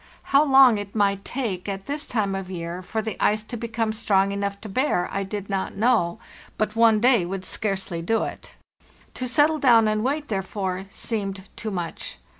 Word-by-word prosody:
How 280 +2 +7
long 265 -6 +6
it 205 0 -8
might 200 -2 +1
take 205 -8 -3
at 195 0 -5
this 295 +2 -4
time 210 -4 0
of 195 -1 -4
year 175 0 -5
for 220 +4 -3
the 220 -2 -4
ice 215 +1 +2
to 225 - -7
become 225 -1 -2
strong 200 -3 +2
enough 200 0 -3
to 220 - -7
bear, 195 -4 0
I 195 - -1
did 200 0 -5
not 195 -1 -2
know, 215 -5 +2 0.4
but 215 0 -1
one 225 -2 +5
day 240 -4 +4
would 185 +2 -4
scarcely 195 -5 -2
do 225 +7 +1
it. - - -7 0.6
To 255 - -3
settle 295 +5 +3
down 230 -5 +5
and 215 0 0
wait, 290 +3 -1
therefore, 190 -2 -3
seemed 195 -3 -4
too 220 - -4
much. 175 -5 -5
210 Hz, 190 wpm, -24 LUFS, 195-230 Hz, 0.6 s, How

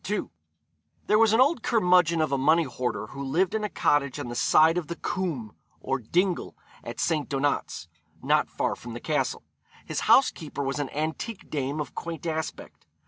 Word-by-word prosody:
II. 210 - -1 0.8
There 210 - +3
was 225 -2 +5
an 225 - +3
old 265 0 +4
curmudgeon 180 -8 +3
of 155 - 0
a 140 - +2
money 160 +5 +4
hoarder 125 -6 -3
who 140 0 -6
lived 170 +7 +1
in 220 -1 -1
a 210 - -1
cottage 140 -7 +1
on - - -5
the 120 - -5
side 160 +6 +4
of 175 -4 -2
the 170 - -4
cwm, 155 - -3 0.3
or 135 0 -2
dingle, 175 - -1 0.3
at - - -7
St. 155 -4 0
Donat's, 140 - -1 0.3
not - - +2
far - - -1
from 120 -1 -9
the - - -5
Castle. 150 +4 -1 0.4
His - - -3
housekeeper 155 - +3
was 135 +1 -2
an 145 -2 -2
antique 160 +8 -4
dame 145 0 -2
of 145 -4 -4
quaint 170 -1 -6
aspect. 160 - -5
155 Hz, 185 wpm, -26 LUFS, 135-180 Hz, 0.8 s, was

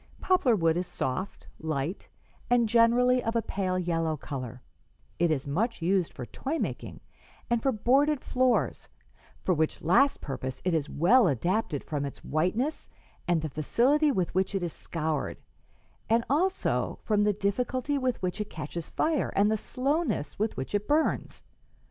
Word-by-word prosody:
Poplar 325 -11 +3
wood 165 -3 +2
is 180 0 -2
soft, 185 +10 -4
light 155 +3 -3 0.4
and 240 -1 +4
generally 240 +3 +4
of 225 +1 -2
a 230 - +3
pale 185 -2 -1
yellow 165 -3 0
color; 130 -3 -6 0.6
it 170 0 +3
is 145 -4 0
much 200 - -1
used 180 0 +1
for 125 - -7
toy 275 - -4
making - - -4 0.5
and 235 -1 +2
for 270 - +2
boarded 270 +6 +3
floors, 255 -1 0 0.5
'for 185 - +2
which 160 -1 -1
last 245 - +4
purpose 130 -2 -5
it 180 - +2
is 155 -2 0
well 205 - +4
adapted 170 - 0
from 145 -2 -3
its 140 - -7
whiteness 215 - -1 0.4
and 170 -3 +2
the - - -1
facility 260 - +2
with 185 -9 -1
which 190 +2 0
it 190 - -1
is 170 - -3
scoured, 155 -3 -2 0.7
and 230 +1 +3
also 365 +7 0
from 210 -1 +2
the 210 - +3
difficulty 250 +8 -1
with 255 -2 -1
which 185 +3 -1
it 210 - -5
catches 160 +1 -6
fire 310 -2 0
and 205 +2 +4
the - - +3
slowness 260 - -1
with 215 +1 -1
which 130 - -5
it 205 0 -1
burns. 310 +2 0
200 Hz, 160 wpm, -28 LUFS, 160-250 Hz, 0.7 s, and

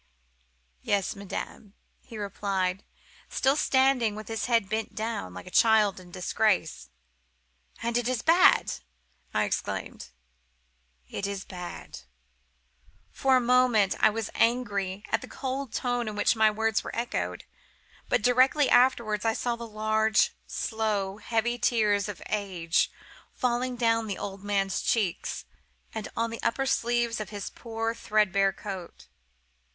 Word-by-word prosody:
"'Yes, 200 0 0
madame,' 200 +1 -7 0.2
he 230 - -11
replied, 195 -2 -2 0.5
still 270 +1 +2
standing 260 -6 +3
with 215 0 -8
his 225 -1 -2
head 230 -5 +2
bent 220 +2 -3
down, 220 - -3
like 90 - -8
a 185 - -10
child 220 -3 +4
in 180 -1 -14
disgrace. 180 - 0 0.9
"'And 235 0 -1
it 240 0 +1
is 250 -2 -1
bad!' 340 +3 +5 0.6
I - - +1
exclaimed. - - -4 1.0
"'It 200 - -4
is 200 -1 -5
bad.' 180 -2 -8 1.1
For 265 -1 +2
a - - +5
moment 245 -5 +4
I - - +6
was 220 0 -4
angry 205 -5 0
at - - +2
the - - -9
cold 270 -1 -4
tone 245 0 -1
in 215 - -4
which 205 +3 +2
my 220 -1 +5
words 220 +1 0
were - - -6
echoed; 235 +1 -3 0.7
but - - +2
directly 260 +4 +4
afterwards 235 -4 +3
I 225 -1 +2
saw 240 +1 -1
the 235 0 -7
large, 215 0 +2 0.2
slow, 210 -3 -2
heavy 235 +2 -1
tears 210 -4 +2
of 205 - -7
age 185 -6 0 0.5
falling 250 0 0
down 230 -2 +1
the 200 - -3
old 195 -1 -6
man's 195 -2 0
cheeks, 205 -7 -1 0.5
and 220 -1 -5
on 230 0 0
to 230 - -6
the 250 +4 0
sleeves 240 -2 +1
of 215 - -5
his 205 -2 -6
poor, 225 -1 -3
threadbare 200 -3 +2
coat. 190 - -8
220 Hz, 140 wpm, -28 LUFS, 200-235 Hz, 1.1 s, I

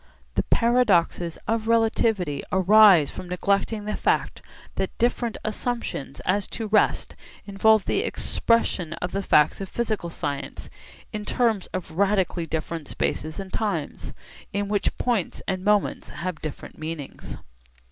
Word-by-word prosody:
The - - +2
paradoxes 200 -8 +2
of 225 0 0
relativity 220 -9 +2
arise 190 -4 +6
from 180 - -8
neglecting 200 +3 0
the 210 - -2
fact - - 0 0.3
that 190 -1 -3
different 240 -1 0
assumptions 215 - -3
as 195 +1 0
to 225 - -3
rest 210 0 +2 0.3
involve 215 +1 +3
the - - +1
expression 230 - 0
of 180 +1 -4
the 195 - -1
facts 150 -2 +3
of 195 - -5
physical 215 -7 -2
science 145 -3 -5 0.4
in 210 -1 -3
terms 225 -3 +1
of 185 -3 -5
radically 190 -2 +1
different 160 0 -4
spaces 155 +5 -2
and 190 -1 -7
times, 195 -9 -3 0.4
in 200 0 -2
which 205 -1 0
points 235 -8 -1
and 185 -1 -2
moments 210 0 +1
have 170 +2 -5
different 155 -2 -7
meanings. 155 -3 -6
195 Hz, 135 wpm, -25 LUFS, 170-220 Hz, 0.4 s, arise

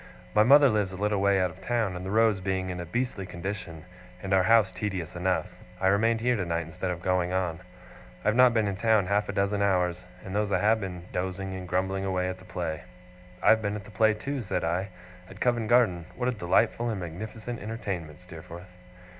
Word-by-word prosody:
My 105 - +5
mother 140 +5 +7
lives 105 -5 +1
a - - -7
little 105 0 0
way 100 -1 +3
out 90 -1 +1
of 90 +2 -16
town; 115 -3 -1
and 90 - -6
the 95 - -5
roads 110 -1 +3
being 95 -1 -2
in 90 - -5
a 85 - -6
beastly 115 -1 -2
condition, 85 -3 -6 0.4
and 95 0 -1
our 95 - +5
house 110 -1 +4
tedious 90 -4 -4
enough, 90 +1 0 0.3
I 95 - +3
remained 110 +3 +2
here 125 +1 +2
tonight 85 -5 -2
instead 90 +3 -5
of 90 0 -4
going 90 -1 +1
on. 90 -3 -1 0.7
I - - +5
have 105 - +1
not 125 0 +7
been 110 -3 +1
in 100 -2 -3
town 110 -2 +3
half 100 +2 0
a - - +1
dozen 100 +1 0
hours, 90 -3 +1 0.2
and 95 - -6
those 105 0 0
I - - +3
have 110 +4 +2
been 90 -3 -6
dozing 95 +1 -3
and 95 -1 -6
grumbling 95 +2 -1
away 95 -1 0
at 95 0 -6
the 95 - -15
play.' 80 -4 -4 0.6
'I - - +5
have 110 - +4
been 100 -1 -2
at 105 - -6
the 105 - -12
play, 110 0 +3
too,' 135 +5 -4
said 100 - -2
I. 85 +4 -1 0.4
'At - - -12
Covent 120 -3 +1
Garden. 100 -9 +3
What 125 - -2
a - - +2
delightful 115 +3 +1
and 110 -4 -2
magnificent 110 +7 -6
entertainment, 95 -8 -5
Steerforth! 90 0 -11
95 Hz, 220 wpm, -27 LUFS, 90-110 Hz, 0.7 s, mother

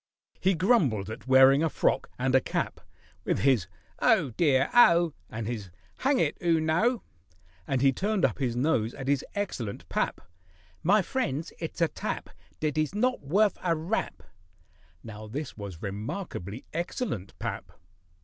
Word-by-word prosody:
He 190 0 +2
grumbled 155 - +2
at 110 - -9
wearing 135 +2 +7
a 165 - +2
frock - - 0
and 130 +1 0
a 130 - +5
cap, - - -3 0.4
With - - 0
his 130 -10 +3 0.3
"Oh, 130 - +3
dear, 135 +1 +2
oh!" 170 -9 +6 0.2
And 110 0 -5
his 105 -4 -4 0.3
"Hang 275 +1 +2
it! - - 0
'oo 165 -2 +3
know!" 175 +9 +1 0.6
And 135 -1 0
he 135 -1 +5
turned 205 +6 +1
up 130 - -1
his 125 -4 -1
nose 120 -4 +1
at 135 -2 -7
his 140 0 +2
excellent 130 - -4
pap— - - -1 0.6
"My 195 +4 +4
friends, 165 - -2
it's 165 +1 -5
a 165 - +5
tap - - -5 0.3
Dat 155 -1 -1
is 155 +5 -1
not 255 +4 +1
worf 195 +9 +2
a 170 -2 +2
rap." 165 +8 -3 0.8
(Now 110 -1 -9
this 145 +8 -5
was 100 -6 -8
remarkably 105 - -5
excellent 170 - -3
pap.) - - -5
145 Hz, 155 wpm, -28 LUFS, 120-180 Hz, 0.8 s, wearing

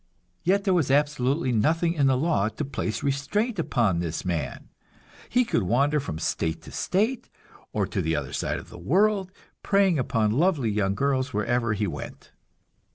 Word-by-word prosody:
Yet 195 +3 +2
there 195 -2 +2
was 165 -7 +2
absolutely 140 0 +1
nothing 165 +9 +2
in 145 -5 +2
the 130 -1 +3
law 130 -8 +1
to 110 +7 -4
place 135 -5 -3
restraint 180 - -1
upon 115 - +1
this 85 0 -3
man; 85 -7 -3 0.6
he 250 0 +3
could 170 - +1
wander 140 +10 +2
from 105 - -5
state 80 0 -2
to - - -11
state, 220 +7 -1 0.4
or - - 0
to - - -2
the 80 0 0
other 70 -3 -4
side - - -1
of - - -10
the - - -11
world, 190 - +2 0.3
preying 195 -6 +3
upon 115 -5 +1
lovely 140 - +2
young 100 -2 0
girls 135 +1 0
wherever 115 +1 +1
he 105 0 -1
went. 90 - -7
135 Hz, 170 wpm, -26 LUFS, 105-170 Hz, 0.6 s, the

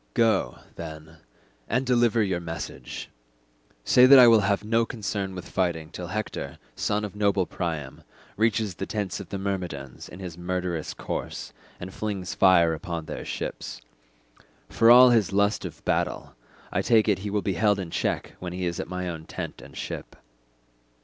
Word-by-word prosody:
Go, 110 -4 +2 0.2
then, 80 0 -9 0.5
and 125 +2 +1
deliver 120 -3 +3
your 95 -3 -1
message; 80 -3 -6 0.8
say 125 - +6
that 135 +1 +10
I 125 -2 +10
will 115 -1 +7
have 100 0 +1
no 115 +2 +2
concern 100 -4 -3
with 90 -1 -7
fighting 85 -4 -1
till 90 -1 -6
Hector, 110 +4 -4 0.2
son 105 +1 0
of 105 - -8
noble 100 -2 +2
Priam, 80 -6 -4 0.3
reaches 110 -2 +1
the - - -5
tents 105 -4 -3
of - - -9
the 100 - -3
Myrmidons 90 -9 -4
in 90 - -11
his 90 -3 -7
murderous 90 -2 -3
course, - - -5 0.3
and 95 +1 -7
flings 100 -4 -3
fire 85 -4 +5
upon 80 0 -5
their - - -6
ships. - - -5 0.9
For 115 - +4
all 125 +1 +9
his 110 -5 +3
lust 100 +2 +2
of - - -9
battle, - - -1 0.4
I - - +1
take 115 -2 +4
it 100 -4 +2
he 100 +2 -4
will 105 0 -1
be 95 - 0
held 105 +3 +2
in 90 -4 -5
check - - -2
when 90 -1 -5
he 90 0 -3
is 85 -1 -2
at - - -3
my 90 0 -3
own 80 -2 -5
tent - - -6
and - - -13
ship." - - -6
95 Hz, 175 wpm, -26 LUFS, 85-110 Hz, 0.9 s, that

